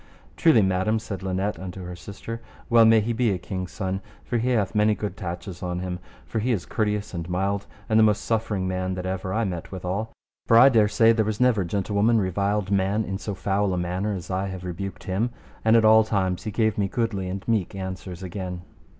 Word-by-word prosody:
Truly, 155 - +5
madam, 95 +3 +1
said 105 -4 -5
Linet 95 +2 -2
unto 95 0 -7
her 90 0 -6
sister, 105 +5 -7 0.3
well 115 -1 +7
may 110 0 +6
he 115 +3 -1
be 115 0 +2
a 95 - 0
king's 90 0 -5
son, 95 -1 -3 0.2
for 120 - -1
he 120 +3 0
hath 110 -6 +1
many 105 0 +3
good 105 -3 -4
tatches 90 0 -6
on 90 -1 -2
him, 90 0 -4 0.3
for 110 - -3
he 125 +4 0
is 100 -7 -1
courteous 105 -2 -1
and 85 -1 -5
mild, 100 +2 -1 0.2
and 110 0 +4
the - - +7
most 105 -1 +3
suffering 110 -4 -1
man 95 0 -2
that 90 0 -5
ever 95 0 -3
I 115 +4 +1
met 90 -5 -4
withal. 95 +4 -3 0.4
For 115 - +6
I 130 +4 +9
dare 110 -5 +4
say 115 +2 +5
there 110 -1 +2
was 105 0 -2
never 125 -6 +3
gentlewoman 100 +5 +1
reviled 100 0 0
man 100 +2 +2
in 95 +1 -4
so 100 -2 -4
foul 95 0 0
a - - -2
manner 90 +4 -1
as 90 0 -7
I 95 +1 -1
have 95 -1 -6
rebuked 95 +2 -5
him; 105 +5 0 0.3
and 110 +1 +5
at 115 -1 +5
all 110 0 +7
times 95 -3 -1
he - - -1
gave 110 0 +1
me 100 - +2
goodly 100 -2 -2
and 95 +1 -5
meek 110 -5 0
answers 95 -1 -6
again. 90 -1 -5
100 Hz, 220 wpm, -25 LUFS, 95-110 Hz, 0.4 s, I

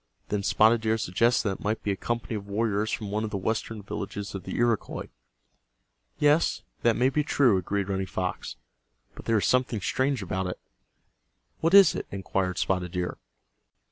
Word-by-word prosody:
Then 105 -1 0
Spotted 110 +3 +4
Deer 110 0 +1
suggested 115 +4 +1
that 95 - -2
it - - -12
might 110 +2 -1
be 105 - 0
a - - 0
company 115 +1 -3
of 100 -1 -6
warriors 105 0 0
from 105 -3 -3
one 105 +1 -1
of 110 - -2
the 100 - -3
western 110 +1 -3
villages 100 +1 -5
of 95 - -6
the - - -5
Iroquois. 120 -2 0 1.1
"Yes, 150 +3 +3 0.2
that 115 -1 +3
may 130 +2 +3
be 150 +2 0
true," 130 -8 +3
agreed 100 +2 -2
Running 95 -1 -2
Fox. 90 0 -4 0.6
"But - - -12
there 115 - +2
is 100 - +1
something 125 -3 +2
strange 130 +3 0
about 95 0 -2
it." 90 - -5 1.0
"What 165 +4 +3
is 195 -5 +8
it?" - - -5
inquired 95 -1 -2
Spotted 90 -2 -1
Deer. 90 -1 -3
105 Hz, 180 wpm, -27 LUFS, 95-120 Hz, 1.1 s, is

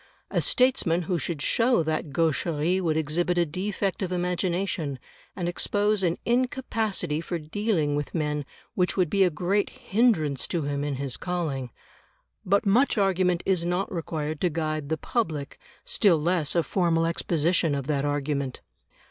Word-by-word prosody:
A - - +1
statesman 250 -10 +2
who 175 +1 -1
should 150 +1 -3
show 235 -6 +3
that 155 0 -2
gaucherie 165 +3 +1
would 160 -3 +1
exhibit 170 +3 0
a 175 - +4
defect 190 +4 -2
of 185 -2 -2
imagination, 180 -4 -1 0.4
and 180 -3 -2
expose 205 +3 +1
an 175 -2 +1
incapacity 230 - 0
for 175 +1 -3
dealing 160 -2 -1
with 145 +3 -3
men 150 -2 -1 0.3
which 180 0 0
would 180 -4 +2
be 195 -1 +4
a 185 - +4
great 180 +6 0
hindrance 190 - +1
to 170 -4 -1
him 140 0 -2
in 145 -1 -2
his 135 -1 -2
calling. 155 -8 -3 0.7
But 200 +4 +2
much 235 +6 +3
argument 185 -3 +2
is 185 -3 +2
not 180 +3 -1
required 155 -3 -3
to 180 - +3
guide 155 -2 -2
the 160 - 0
public, 155 - -2 0.3
still 195 -6 +3
less 165 -1 0
a 170 - +3
formal 165 -3 +1
exposition 165 -1 +1
of 140 -2 -3
that 140 -1 0
argument. 145 -2 -2
170 Hz, 155 wpm, -26 LUFS, 150-190 Hz, 0.7 s, a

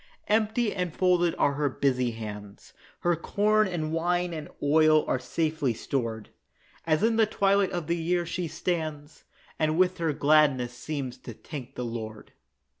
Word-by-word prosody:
Empty 220 +1 +1
and 180 -2 -2
folded 175 0 +2
are 140 - +2
her 145 0 0
busy 130 -2 +1
hands; 105 -3 -8 0.3
Her 175 0 +2
corn 210 +5 +2
and 160 -4 -3
wine 175 +1 0
and 155 -3 -6
oil 155 +1 +4
are 130 - 0
safely 155 -1 -1
stored, 115 -5 -3 0.6
As 155 +3 +2
in 225 0 +3
the 220 -1 +4
twilight 200 -2 +2
of 175 -3 -3
the 170 +3 0
year 175 +1 0
she 170 +1 -3
stands, 155 -3 -4 0.3
And 155 0 +1
with 185 0 +2
her 165 -2 +1
gladness 140 -4 +3
seems 130 -1 -5
to 120 - -9
thank 135 +2 -9
the 125 - -3
Lord. 110 -2 -7
155 Hz, 160 wpm, -27 LUFS, 130-180 Hz, 0.6 s, oil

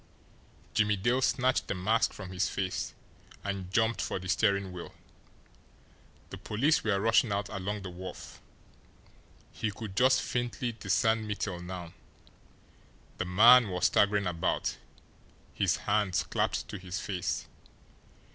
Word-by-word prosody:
Jimmie 105 -1 +3
Dale 120 +7 +1
snatched 130 0 +1
the - - -2
mask 110 +5 +2
from 95 -2 -9
his 95 0 0
face, 95 -1 -3 0.5
and 100 -2 -4
jumped 110 +2 +1
for - - -2
the 95 0 -7
steering 100 +1 +1
wheel. 90 -1 -9 1.4
The - - -7
police 140 +9 +1
were 100 -3 +1
rushing 115 +1 +3
out 100 0 -1
along 100 0 -4
the 90 - -6
wharf. 90 +1 -9 1.1
He 110 - -2
could 105 -1 -7
just 130 +4 +4
faintly 120 0 -2
discern 110 +1 +1
Mittel 100 -4 -3
now 90 -2 -7 1.3
the - - -1
man 115 +5 +7
was 90 -1 0
staggering 100 0 +3
about, 85 -2 -1 0.8
his - - +1
hands 100 -3 +1
clapped - - -1
to - - -6
his 90 0 -5
face. 95 -3 -3
100 Hz, 130 wpm, -30 LUFS, 95-110 Hz, 1.4 s, man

